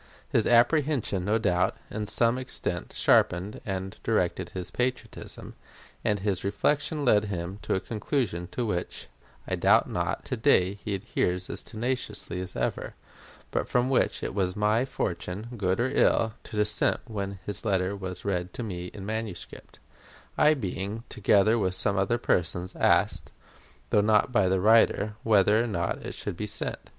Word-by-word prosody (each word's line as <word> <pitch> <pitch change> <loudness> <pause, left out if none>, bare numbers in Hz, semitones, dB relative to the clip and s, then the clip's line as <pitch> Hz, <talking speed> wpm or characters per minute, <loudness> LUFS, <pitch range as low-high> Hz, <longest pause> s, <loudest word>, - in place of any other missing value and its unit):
His - - +2
apprehension, 120 - +3
no 105 +3 +2
doubt, 90 -5 +1
to 105 0 -3
some 115 +3 +2
extent 90 -8 -3
sharpened 90 +4 +2
and 95 0 -4
directed 90 -5 0
his 90 -2 -6
patriotism, 125 0 -4 0.5
and 105 - +1
his 100 -2 -1
reflection 140 - 0
led 105 -3 +4
him 95 0 -4
to - - -1
a - - +1
conclusion 105 - -2
to 125 - -1
which, 90 -5 -4 0.4
I - - 0
doubt - - +4
not, - - -2
to - - -2
day 95 +3 +3
he 100 - -1
adheres 90 -1 -1
as - - -2
tenaciously 110 -5 -3
as 95 0 -6
ever; 60 -1 -2 0.6
but - - -1
from 125 +2 +2
which 130 - +1
it - - -3
was 95 -2 0
my 105 +4 +2
fortune, 100 -2 -4
good 95 -3 0
or 125 +2 +1
ill, 115 -4 +3
to - - -9
dissent 105 0 +1
when 100 -4 -4
his 105 - -5
letter 95 -2 +1
was 95 -2 -7
read 90 -2 -2
to 120 - -5
me 90 -5 -5
in 100 -2 -7
manuscript 110 -4 -6 0.6
I 155 +1 +5
being, 100 -1 -4
together 110 +1 +3
with 95 -3 0
some 100 0 0
other 100 +5 +1
persons, 90 -4 -1
asked, - - +2 0.6
though 105 - +5
not 105 +3 +3
by 100 -6 +3
the 95 0 +2
writer, 110 0 +4
whether 105 +1 +4
or - - -2
not 85 -6 -2
it - - -6
should - - -5
be 105 - -3
sent. - - -4
105 Hz, 165 wpm, -27 LUFS, 95-115 Hz, 0.6 s, I